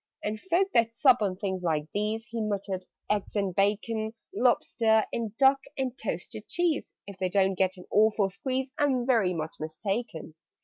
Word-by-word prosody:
"And 215 +1 -2
folk 375 - +2
that 230 -1 +3
sup 250 -2 +5
on 195 -3 0
things 190 -1 -3
like 160 -4 0
these 215 +2 -1
" - - -28
He 230 -1 -2
muttered, 195 -3 -3 0.2
"eggs 210 0 -1
and 200 -3 0
bacon 215 +3 0 0.2
Lobster 225 -3 +3
and 225 -2 -3
duck 270 0 +5 0.2
and 260 -2 -2
toasted - - -5
cheese 345 -4 0 0.2
If 200 -2 -10
they 185 -1 0
don't 195 0 +3
get 185 0 0
an 180 - -11
awful 210 -2 +3
squeeze, 260 +5 -2
I'm 265 -4 +2
very 220 -8 +2
much 160 -1 -4
mistaken! 165 +2 -4
215 Hz, 175 wpm, -28 LUFS, 190-240 Hz, 0.2 s, sup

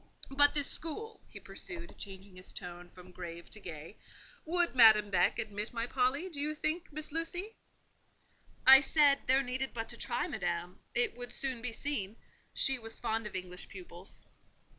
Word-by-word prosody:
But 290 +2 +6
this 290 -1 +1
school," 440 +8 -4
he - - -9
pursued, 345 -2 -5
changing 195 -1 -9
his 185 0 -11
tone 175 -1 -8
from 180 0 -14
grave 170 -1 -8
to 215 - -7
gay: 165 -1 -9 0.5
"would 345 +1 +1
Madame 215 -4 +8
Beck 185 - +4
admit 215 -1 -4
my 230 0 -1
Polly, 265 +7 +1
do 305 -6 -5
you 305 +1 -1
think, 315 +3 -2
Miss 310 +1 -6
Lucy?" 355 +7 -3 1.1
I 265 +1 +11
said, 290 -2 +4
there 265 +2 +4
needed 260 +1 -3
but 225 -1 -3
to - - -3
try - - -2
Madame; - - -3 0.2
it 465 -3 +2
would 245 0 -7
soon 255 -1 -1
be 240 0 -2
seen: 225 -5 -3 0.4
she 265 -1 +3
was 225 -1 -7
fond 225 -2 -1
of - - -9
English 180 0 -4
pupils. 185 -2 -8
245 Hz, 170 wpm, -32 LUFS, 200-295 Hz, 1.1 s, I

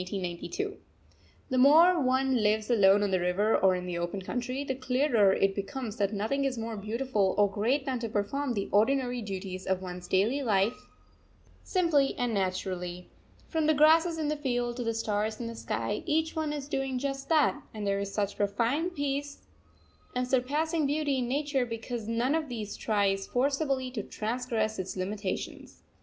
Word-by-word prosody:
_ 185 - -4 0.7
The 255 - +2
more 325 +6 +6
one 260 0 +2
lives 215 +1 +1
alone 200 -2 +5
on 200 - 0
the 185 - +2
river 180 +5 +2
or 190 -1 +4
in 180 0 -4
the 175 -1 -3
open 175 +3 -3
country, 250 +6 -3
the 270 - -2
clearer 255 -5 +2
it 195 0 +2
becomes 220 +3 -5
that 200 -1 +1
nothing 220 +7 -1
is 270 -2 -1
more 225 0 -4
beautiful 215 -1 0
or 205 -1 +5
great 235 +8 0
than 260 -3 -1
to 230 -1 -3
perform 240 +6 -1
the 200 -1 -2
ordinary 245 +3 +2
duties 190 -2 -6
of 190 -1 +1
one's 180 -1 -7
daily 220 +9 +2
life 210 -2 0 0.7
simply 325 -7 +2
and 245 -2 0
naturally. 185 -2 -3 0.4
From 320 -2 0
the 315 - +4
grasses 325 +3 +5
in 310 -2 -1
the 300 - 0
field 245 -4 -2
to 245 - -2
the 230 -1 -1
stars 215 -1 -1
in 240 - -4
the 230 - -5
sky, 230 - -3
each 320 0 +1
one 315 -2 -1
is 290 -2 -4
doing 270 -2 -2
just 275 +1 -3
that; 300 -3 +3
and 215 -2 -5
there 200 0 +1
is 200 0 -3
such 205 -1 -2
profound 235 - 0
peace 285 0 -3 0.7
and 250 0 0
surpassing 295 +5 +1
beauty 290 -2 0
in 245 - -1
nature 280 0 0
because 230 -1 -5
none 235 +4 +1
of 315 -3 -1
these 215 -4 -5
tries 200 -3 0
forcibly 270 0 0
to 235 -4 -3
transgress 220 0 -2
its 190 +1 -4
limitations. 195 +1 -4
240 Hz, 180 wpm, -29 LUFS, 205-275 Hz, 0.7 s, more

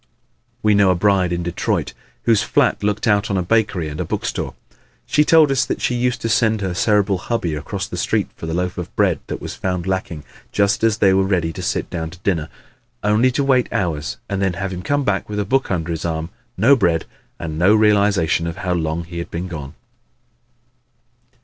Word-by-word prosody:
We 105 -1 +4
know 100 -2 +4
a 90 - +3
bride 95 -1 +2
in 85 0 -1
Detroit 85 0 -1 0.3
whose 115 -3 +3
flat - - +1
looked 105 0 0
out 105 -1 +2
on 100 - 0
a 90 - 0
bakery 95 -4 +1
and 75 0 -6
a - - 0
bookstore. - - -3 0.5
She 150 - +3
told 155 -2 +5
us 130 -2 +2
that - - -3
she - - 0
used 125 +1 0
to - - -1
send 110 -2 +2
her 95 -2 -2
Cerebral 100 0 +2
hubby 90 -7 -2
across 75 -1 -4
the - - -7
street - - 0
for 80 - -7
the 80 - -3
loaf 90 0 -2
of 90 - -7
bread - - +2
that - - -4
was - - -6
found 90 -2 -3
lacking 95 -5 -3 0.3
just 100 +1 +1
as 110 -1 +3
they 95 -2 +4
were 95 - +4
ready 90 -4 0
to - - -6
sit - - -1
down 80 -2 -3
to 85 +1 -13
dinner 80 -5 0 0.5
only 105 +5 +3
to 140 - +1
wait 130 -3 +2
hours 75 -9 -2
and 100 -1 -2
then 95 -2 +1
have 95 +2 -4
him 90 - -5
come 145 +8 0
back 105 -4 -1
with 105 - -4
a 105 - 0
book 135 +6 +1
under 85 -3 -1
his 80 - -3
arm, 80 0 -3 0.3
no 135 +5 +6
bread 85 -9 +1 0.3
and 80 -1 -5
no 95 +5 +5
realization 100 -6 +3
of 85 +2 -5
how 90 -3 -1
long 80 0 -1
he 85 +1 -7
had 85 - -5
been 85 +2 -4
gone. 75 -4 -7
95 Hz, 215 wpm, -20 LUFS, 85-105 Hz, 0.5 s, no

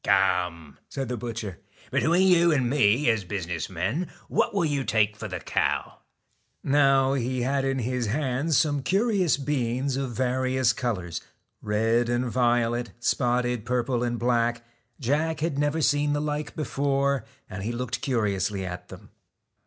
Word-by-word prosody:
'Come,' 85 -5 +1
said 135 -3 -4
the 125 - -1
butcher; 110 -5 -5 0.3
'between 175 +4 +3
you 170 -2 +5
and 135 -5 +2
me, 125 0 +3
as 110 -3 +2
business 90 -3 -4
men, 95 - -2 0.2
what - - +1
will 200 -4 +1
you 145 -3 0
take 105 -3 +2
for 110 +1 -6
the 95 -2 -5
cow? - - -1 0.3
' - - -45
Now, 135 -1 +4
he 130 -1 -1
had 135 +1 0
in 135 0 0
his 125 -1 -1
hands 135 +4 0
some 145 -3 +2
curious 195 - +2
beans 135 -1 -1
of 135 -1 -2
various 130 0 +1
colours, 95 -9 -3 0.4
red 115 +3 +1
and 120 +1 +1
violet, 120 -1 +1
spotted 120 -1 0
purple 120 +1 0
and 120 -1 -1
black. 120 0 +1 0.4
Jack 150 +4 0
had 155 -3 -1
never 145 +2 +1
seen 145 0 +2
the 145 - 0
like 150 0 -3
before, 140 -3 0 0.2
and 95 +1 -7
he 110 +4 -2
looked 125 +1 -3
curiously 100 -6 0
at 90 -1 -6
them. - - -13
125 Hz, 155 wpm, -26 LUFS, 115-140 Hz, 0.4 s, you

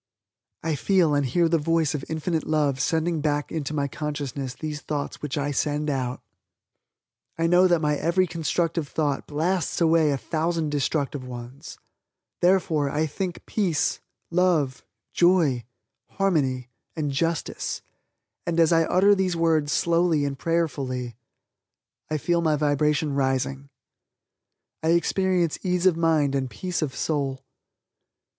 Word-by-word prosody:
I 165 0 0
feel 170 +1 +2
and 145 0 +2
hear 165 +7 +2
the 165 0 +2
voice 165 0 +1
of 145 -3 -3
infinite 160 0 -2
love 150 -4 +1
sending 160 +1 0
back 145 -1 -1
into 155 -3 -3
my 145 -2 0
consciousness 140 -3 -4
these 150 +1 -5
thoughts 145 -2 -4
which 150 0 -3
I 145 0 -1
send 150 +1 0
out. 130 -2 -2 1.2
I 165 - +1
know 180 +2 +5
that 175 -3 +2
my 150 -1 +1
every 180 +4 +2
constructive 165 -1 -1
thought 145 -2 -1
blasts 165 +4 -1
away 165 -2 +4
a 140 - +1
thousand 160 +5 -1
destructive 145 -1 -1
ones. 125 +2 -9 0.6
Therefore, 175 -5 +2
I 150 +3 0
think 175 +4 -4
peace, 185 -8 0 0.3
joy, - - -5
love, 165 -8 +2 1.3
harmony 135 -10 0 0.3
and 150 -3 -2
justice, 165 +4 -2 0.6
and, 170 0 0
as 165 0 +5
I 165 0 +4
utter 195 +5 +4
these 190 -3 +1
words 160 -3 +2
slowly 170 -2 +2
and 140 -1 -2
prayerfully, 135 -7 -2 0.9
I 155 - 0
feel 170 +3 +1
my 155 -2 +2
vibration 150 0 +1
rising 135 0 -1 1.1
I 160 +1 +3
experience 180 -1 +1
ease 180 -1 0
of 185 -3 +5
mind 160 -4 +2
and 135 -2 -1
peace 180 +10 -3
of 140 -4 -2
soul. 140 -4 -1
155 Hz, 135 wpm, -25 LUFS, 140-170 Hz, 1.3 s, know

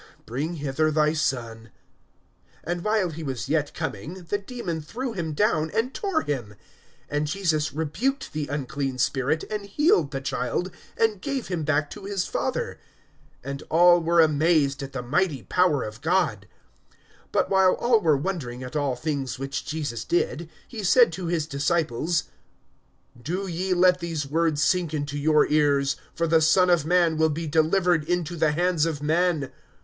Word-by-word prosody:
Bring 145 +9 -3
hither 150 +1 0
thy 155 0 +2
son. 115 -7 -2 1.0
(42)And 175 +1 -2
while 210 -2 +1
he 160 +1 -7
was 135 -5 -4
yet 150 0 0
coming, 165 - -5
the 205 +4 -2
demon 195 -7 -5
threw 240 - -5
him 165 -6 -3
down, 160 -3 +1
and 245 +4 0
tore 390 -6 -1
him. 120 -8 -4 0.5
And 150 +1 -1
Jesus 155 -3 0
rebuked 225 - -2
the 150 -1 -3
unclean 140 -1 -3
spirit, 135 +4 0
and 210 -1 -4
healed 200 - +2
the 135 -1 -4
child, 135 +6 -2 0.3
and 220 -4 +1
gave 275 -6 -3
him 175 -4 -2
back 150 0 0
to 205 -2 -9
his 195 -2 -1
father. - - -3 0.7
(43)And 140 0 -5
all 175 +1 +6
were 170 +1 +2
amazed 155 -2 +2
at 135 0 -7
the 125 -2 -4
mighty 145 +1 0
power 180 -7 +2
of 105 +2 -8
God. 155 - 0 0.8
But - - +1
while 190 -1 +5
all 235 -2 +2
were 155 -4 +3
wondering 135 -7 -4
at 125 +3 -8
all 140 -4 0
things 135 -1 -3
which 135 +2 -4
Jesus 150 -7 -3
did, 170 -1 -1 0.2
he 220 -3 -7
said 235 0 +5
to 180 +1 -4
his 165 -3 0
disciples: 155 +1 0 1.0
(44)Do 180 +7 -3
ye 185 +2 0
let 180 0 +4
these 165 -4 -3
words 155 0 +1
sink 170 -1 +1
into 145 -1 -3
your 150 +1 +4
ears, 140 -2 +2 0.2
for 170 - 0
the 160 0 +3
Son 180 +3 +4
of 160 -3 +2
man 170 -2 +3
will 160 0 +4
be 160 +2 -3
delivered 165 +2 +2
into 175 0 -1
the 155 -2 +2
hands 175 -1 +1
of 150 -3 -4
men. 160 -2 +1
160 Hz, 165 wpm, -25 LUFS, 145-180 Hz, 1.0 s, all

